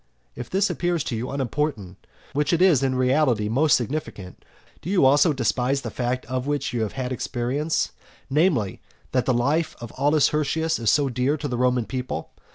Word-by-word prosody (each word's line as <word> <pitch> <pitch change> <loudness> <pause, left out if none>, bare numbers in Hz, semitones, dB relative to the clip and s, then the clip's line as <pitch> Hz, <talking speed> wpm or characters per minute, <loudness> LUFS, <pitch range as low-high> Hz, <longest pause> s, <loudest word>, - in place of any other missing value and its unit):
If 120 - -7
this 195 +2 +1
appears 175 -4 -1
to 120 - -3
you 115 +3 -4
unimportant, 130 - -3 0.3
which 150 +3 +1
is 170 -5 +4
in 130 -1 0
reality 130 -4 +2
most 145 +6 +4
significant, 120 - -5 0.4
do - - -6
you 190 -7 +3
also 145 +4 +5
despise 135 0 0
the - - -6
fact 125 +1 -2
of 130 +1 -3
which 145 -3 -1
you 120 - -1
have 110 - -2
had 130 -1 -4
experience, 130 +5 -1 0.4
namely, 140 - +1 0.3
that 125 -1 0
the - - +4
life 145 +7 0
of 120 -2 -8
Aulus 145 0 +3
Hirtius 155 +1 0
is 115 -2 +1
so 145 -2 +3
dear 130 +4 0
to 145 - -4
the 125 - -3
Roman 125 -1 +1
people? 125 +4 -5
135 Hz, 180 wpm, -24 LUFS, 125-150 Hz, 0.4 s, also